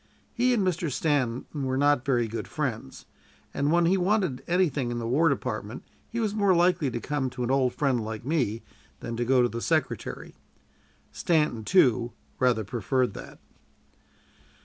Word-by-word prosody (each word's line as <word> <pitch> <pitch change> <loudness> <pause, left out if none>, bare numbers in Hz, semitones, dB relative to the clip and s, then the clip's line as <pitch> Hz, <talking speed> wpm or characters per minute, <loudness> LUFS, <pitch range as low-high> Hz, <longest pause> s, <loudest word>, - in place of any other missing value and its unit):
He 250 +1 +2
and 205 -4 +1
Mr. 175 -4 -1
Stanton 130 -5 0 0.2
were 130 0 -1
not 145 -2 +3
very 125 -4 +1
good 115 +1 -5
friends, 125 - -4 0.5
and 145 +1 0
when 170 0 +4
he 185 +3 +3
wanted 185 -7 0
anything 160 -8 +1
in 120 - -3
the 115 - -3
War 150 +8 +3
Department 115 -4 -3 0.3
he 235 - -3
was 215 -3 0
more 200 -3 +3
likely 170 -4 +2
to 120 - -4
come 135 0 -2
to 125 0 -5
an 120 - -1
old 130 -2 +2
friend 130 -6 +1
like 110 +1 -6
me 130 -8 -1 0.4
than 115 - -5
to 120 - -1
go 125 +1 +3
to - - +3
the 115 0 -5
Secretary. 155 0 -2 0.8
Stanton, 150 -9 0
too, 120 - +3 0.3
rather 125 -4 +2
preferred 120 +3 -1
that. - - -10
135 Hz, 170 wpm, -27 LUFS, 120-165 Hz, 0.8 s, when